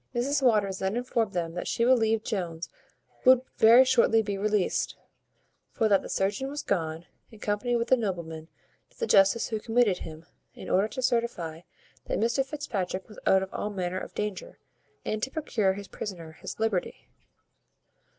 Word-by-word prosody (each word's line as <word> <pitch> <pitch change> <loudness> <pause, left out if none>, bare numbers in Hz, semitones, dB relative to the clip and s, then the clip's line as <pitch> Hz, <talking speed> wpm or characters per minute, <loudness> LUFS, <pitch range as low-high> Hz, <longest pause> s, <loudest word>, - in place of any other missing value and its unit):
Mrs 275 +4 +1
Waters 210 -7 +2
then 190 +2 -1
informed 235 -4 -1
them 170 -2 -2
that 175 - -5
she 235 - 0
believed 225 -3 +3
Jones 175 -6 -3 0.5
would 255 -1 +7 0.2
very 235 +4 +8
shortly 235 -3 +4
be 200 -1 -3
released; 205 -1 0 0.7
for 225 - +1
that 200 -2 +4
the - - -9
surgeon 205 +8 -1
was 290 +1 -5
gone, 165 -3 -2 0.2
in 220 - -15
company 210 +4 -1
with 235 +1 -1
a - - +8
nobleman, 170 -8 -4 0.4
to - - -28
the 465 - -1
justice 195 - +4
who 220 - -2
committed 225 -4 +2
him, 160 0 -9 0.3
in - - -7
order 195 +3 +3
to 260 +3 -6
certify 185 -10 -1 0.4
that - - -2
Mr 235 +4 +2
Fitzpatrick 210 -10 -4
was 210 - -12
out 190 0 +5
of 190 - -8
all 210 - -3
manner 185 -2 -3
of - - -9
danger, 210 -3 -4 0.5
and 215 0 -2
to 265 - -1
procure 230 -10 0
his 200 0 -8
prisoner 175 -7 -7
his 160 - -9
liberty. 220 -5 -2
210 Hz, 170 wpm, -28 LUFS, 185-235 Hz, 0.7 s, very